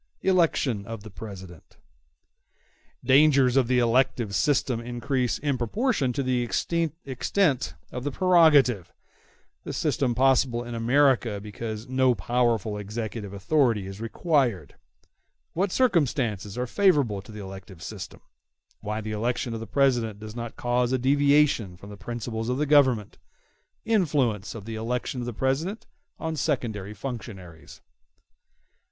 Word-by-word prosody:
Election 165 - +2
Of 115 -3 -7
The 110 - -10
President 95 -3 -11 1.3
Dangers 135 -1 +5
of 135 -3 +3
the 125 0 +2
elective 120 -3 +2
system 125 - +1
increase 125 +1 -1
in 140 -3 -1
proportion 145 - 0
to 140 - -1
the 130 -1 +1
extent 145 - -1 0.2
of 125 - -5
the 145 - -1
prerogative—This 150 - +1
system 125 -4 0
possible 130 -2 +2
in 120 0 -7
America 120 -2 +2
because 110 +2 -6
no 130 -1 +2
powerful 115 0 0
executive 105 0 -5
authority 110 0 +1
is 95 +2 -8
required—What 120 - -3
circumstances 130 - 0
are 125 - -1
favorable 140 - +2
to 110 - -14
the 105 - -9
elective 95 -3 -10
system—Why 95 - -9
the 110 0 -5
election 120 +2 -2
of 115 - -4
the 115 - -7
President 120 -2 +1
does 110 +1 -9
not 120 -1 -6
cause 120 0 0
a 130 - +2
deviation 140 -7 +2
from 100 +4 -12
the - - -8
principles 115 +2 -5
of 125 - 0
the 150 - +1
Government—Influence 135 - 0
of 105 -3 -8
the 115 - -6
election 120 +3 -3
of 120 - -4
the 120 - -4
President 145 - -1 0.3
on 160 0 -3
secondary 110 -9 -2
functionaries. 100 -8 -8
120 Hz, 125 wpm, -26 LUFS, 105-140 Hz, 1.3 s, Dangers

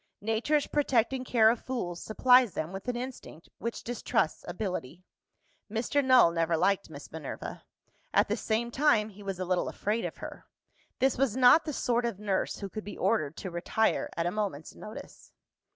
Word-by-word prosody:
Nature's 225 +8 +1
protecting 265 -3 +1
care 225 -3 +5
of 235 - -4
fools 180 -10 -4
supplies 250 0 +4
them 160 +4 -3
with 195 +5 -7
an 250 - -1
instinct 245 -9 -8
which 235 0 -4
distrusts 230 -6 -1
ability. 180 -4 -4 0.7
Mr. 240 +6 +1
Null 255 -9 +6
never 165 0 +1
liked 195 +2 +1
Miss 145 -2 -10
Minerva. 155 -3 -7 0.5
At - - +3
the 210 - 0
same 230 +1 -1
time, 235 -6 +3
he 205 0 -14
was 195 -2 -4
a 185 - -3
little 180 0 0
afraid 215 +3 -2
of - - -5
her. - - -9 0.5
This 265 -1 +1
was 265 -4 +1
not 260 +5 +7
the 310 - -2
sort 240 -2 0
of 235 -5 -2
nurse 200 -2 -1
who 200 - -3
could 215 +2 -7
be 205 - -8
ordered 155 -9 0
to 185 - -6
retire 175 +6 0
at 165 - 0
a 175 - 0
moment's 195 -8 -3
notice. 215 - -11
220 Hz, 180 wpm, -29 LUFS, 185-245 Hz, 0.7 s, not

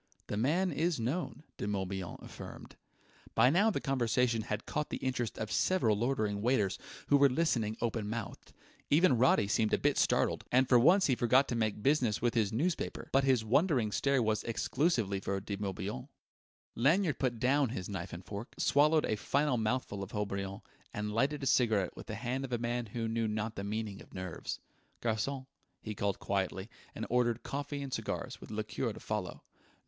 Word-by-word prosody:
"The - - -4
man 160 - +1
is 165 -3 0
known," 150 +7 -2
De - - -3
Morbihan 95 -2 -3
affirmed. - - -10 0.6
By 125 +4 +6
now 200 +7 +4
the 215 - -1
conversation 125 -3 +1
had 105 0 -4
caught 150 0 -2
the - - -3
interest 125 -3 -2
of 110 -1 -4
several 175 - +2
loitering 110 -3 0
waiters, 110 -5 +1 0.3
who 145 - +6
were 140 0 +6
listening 120 -7 0
open 115 -3 -1
mouthed. 115 -1 -6 0.4
Even 155 -1 +5
Roddy 120 -4 +4
seemed 110 0 +2
a - - -2
bit - - +1
startled, - - +2
and 130 +1 +4
for 125 - +6
once 180 +10 +5
forgot 125 +3 +4
to 120 - -1
make 110 -2 -1
business 130 -7 +2
with 120 0 +1
his 110 -4 +1
newspaper; 155 +10 -2
but 135 +1 +4
his 130 -5 +3
wondering 125 - +2
stare 140 +2 +2
was 110 -1 0
exclusively 115 - 0
for 100 0 -2
De 100 +1 -4
Morbihan. 105 +5 -4 0.7
Lanyard 155 +6 +2
put 120 -4 0
down 130 +1 +2 0.2
knife 100 -2 -5
and 90 +1 -8
fork, 105 +4 -7
swallowed 150 +2 +4
a 110 - 0
final 140 +4 +1
mouthful 110 -2 -1
of 100 +2 -7
Haut 105 -1 -1
Brion, 100 0 -4 0.3
and 105 0 -3
lighted 140 +5 +1
a - - -1
cigarette 110 -8 +2
with - - -10
the - - -4
hand 130 +3 -2
of 135 - -6
a 120 - +1
man 120 0 -2
who 115 +2 -3
knew 115 0 0
not 110 +1 -2
the 100 - -4
meaning 105 -1 -4
of - - -15
nerves. 90 -2 -5 0.4
"Garçon!" 120 +4 -1 0.3
he 110 - -5
called 100 -1 -1
quietly; 95 +1 -2 0.2
and - - -4
ordered 120 -1 +1
coffee 145 0 -4
and 135 -2 -6
cigars, - - -4
with - - -10
a 110 - -6
liqueur 110 0 -2
to - - -10
follow.... - - -4
115 Hz, 185 wpm, -32 LUFS, 105-135 Hz, 0.7 s, By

